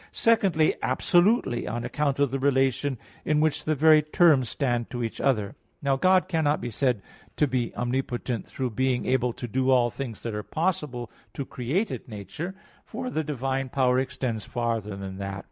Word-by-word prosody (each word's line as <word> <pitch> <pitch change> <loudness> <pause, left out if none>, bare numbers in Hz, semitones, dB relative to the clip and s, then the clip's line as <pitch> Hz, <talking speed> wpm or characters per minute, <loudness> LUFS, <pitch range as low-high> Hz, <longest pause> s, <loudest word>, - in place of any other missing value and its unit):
Secondly 195 -9 +3
absolutely, 175 - +2
on 120 +2 -3
account 145 -2 0
of 140 -2 +2
the 135 - -1
relation 135 0 +1 0.3
in 150 -1 +2
which 155 -1 +1
the 155 - +1
very 155 +1 +6
terms 150 - +4
stand 120 -4 -1
to 120 -2 -3
each 115 - -4
other. 110 -7 +1 0.3
Now 140 -4 +1
God 185 +6 +3
cannot 160 -4 +1
be 120 - -5
said 125 -3 0 0.3
to 150 - +3
be 125 -4 -1
omnipotent 125 -1 -2
through 130 -2 -3
being 130 +2 0
able 125 -1 +1
to 120 - -6
do 130 +3 0
all 125 -2 +4
things 120 -5 -6
that 115 - -3
are 105 - -2
possible 150 - -2 0.2
to 140 - -3
created 145 - -2
nature; 110 - -6 0.3
for 255 +2 -5
the 160 - -1
divine 135 -2 -2
power 130 -1 +2
extends 125 -4 -2
farther 115 -3 -2
than 95 -1 -7
that. 100 0 -4
130 Hz, 175 wpm, -26 LUFS, 120-150 Hz, 0.3 s, very